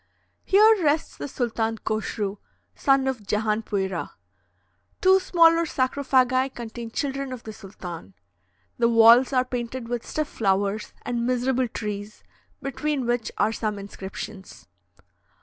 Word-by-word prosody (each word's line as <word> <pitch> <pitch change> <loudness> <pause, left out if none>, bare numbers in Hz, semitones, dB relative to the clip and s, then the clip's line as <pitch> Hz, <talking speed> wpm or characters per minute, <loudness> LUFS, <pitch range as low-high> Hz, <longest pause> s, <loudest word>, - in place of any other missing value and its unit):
Here 425 0 +5
rests 305 +1 +1
the - - -6
Sultan 225 -4 -2
Koshru, 215 -2 -3 0.4
son 270 -2 +2
of 260 -4 -2
Jehanpuira. 210 -3 -1 0.9
Two 380 -1 +5
smaller 335 -2 +4
sarcophagi 260 -1 +1
contain 235 -2 -7
children 275 +2 -3
of 255 -2 -7
the 220 - -8
sultan. 175 - -9 0.6
The 235 - +4
walls 230 +3 +7
are 255 -1 +2
painted 245 -1 -5
with 240 -1 -2
stiff 310 -1 -3
flowers 200 0 -1
and 235 -1 -2
miserable 255 0 +1
trees, 210 -1 -6 0.4
between 275 0 -2
which 240 -2 -1
are 210 +2 +2
some 215 -2 -2
inscriptions. 195 0 -9
235 Hz, 120 wpm, -25 LUFS, 215-265 Hz, 0.9 s, walls